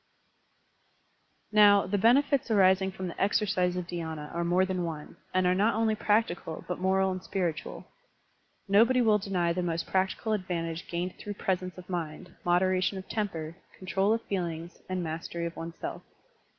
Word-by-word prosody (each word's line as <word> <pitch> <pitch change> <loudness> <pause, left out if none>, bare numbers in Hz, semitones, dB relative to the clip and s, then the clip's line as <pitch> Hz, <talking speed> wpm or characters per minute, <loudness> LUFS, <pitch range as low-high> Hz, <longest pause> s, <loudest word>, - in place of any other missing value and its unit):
Now, 205 -1 +6
the 200 +2 0
benefits* 270 +4 +3
arising 190 -2 +4
from 190 0 -5
the 170 - -6
exercise 195 -3 +1
of 180 -1 -3
dhySna 160 -4 -5
are 170 - -1
more 180 +2 +3
than 185 -1 -2
one, 155 -3 -6 0.2
and 185 0 +2
are 180 - +4
not 205 +4 +2
only 220 0 +2
practical 205 -7 0
but 180 - -3
moral 190 +1 +2
and 185 0 -4
spiritual. 175 -5 -3 0.8
Nobody 230 +6 +5
will 220 -3 +4
deny 180 -4 0
the 180 - -1
most 170 -1 -2
practical 190 +4 0
advantage 170 -4 -3
gained 175 +1 -4
through 205 -1 -6
presence 185 -2 -2
of 180 -1 -10
mind, 170 -1 -5
moderation 185 +1 +2
of 190 - -8
temper, 170 -7 -3 0.2
control 190 +2 0
of 225 0 +1
feelings, 170 -3 -4
and 185 -1 -1
mastery 170 +1 -4
of 170 - -5
oneself. 165 0 -6
185 Hz, 160 wpm, -29 LUFS, 170-200 Hz, 0.8 s, Now